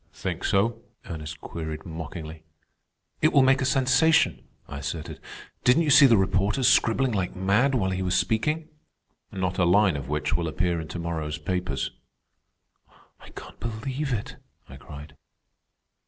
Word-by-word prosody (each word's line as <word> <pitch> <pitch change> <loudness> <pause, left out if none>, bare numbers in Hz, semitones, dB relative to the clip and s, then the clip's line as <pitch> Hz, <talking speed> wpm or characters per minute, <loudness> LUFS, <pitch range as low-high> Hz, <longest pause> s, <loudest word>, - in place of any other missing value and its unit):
"Think - - -5
so?" 115 +4 +1 0.2
Ernest 80 -2 -7
queried 80 -1 -6
mockingly. 80 -1 -7 0.8
"It 155 - +4
will 140 - +5
make 135 +1 +4
a - - +1
sensation," 135 +5 +3 0.2
I 70 - -7
asserted. 75 +3 -6 0.4
"Didn't 125 +7 +4
you 150 - +1
see 140 0 +8
the 115 -3 +5
reporters 100 +6 +1
scribbling 130 -1 +3
like 95 -4 -2
mad 100 +9 +2
while 95 -6 0
he 95 0 -2
was 90 -1 0
speaking?" 155 +8 0 0.6
"Not 95 -1 -2
a - - +4
line 95 0 +4
of 70 -2 -6
which 75 0 -1
will 85 -1 -1
appear 85 +1 -1
in 80 - -8
to 90 - -7
morrow's 80 -3 -3
papers." 85 -3 -3 1.3
"I - - -15
can't - - -11
believe 130 +5 -4
it," 110 -4 -4 0.3
I 65 - -11
cried. 75 +1 -11
95 Hz, 155 wpm, -25 LUFS, 80-130 Hz, 1.3 s, see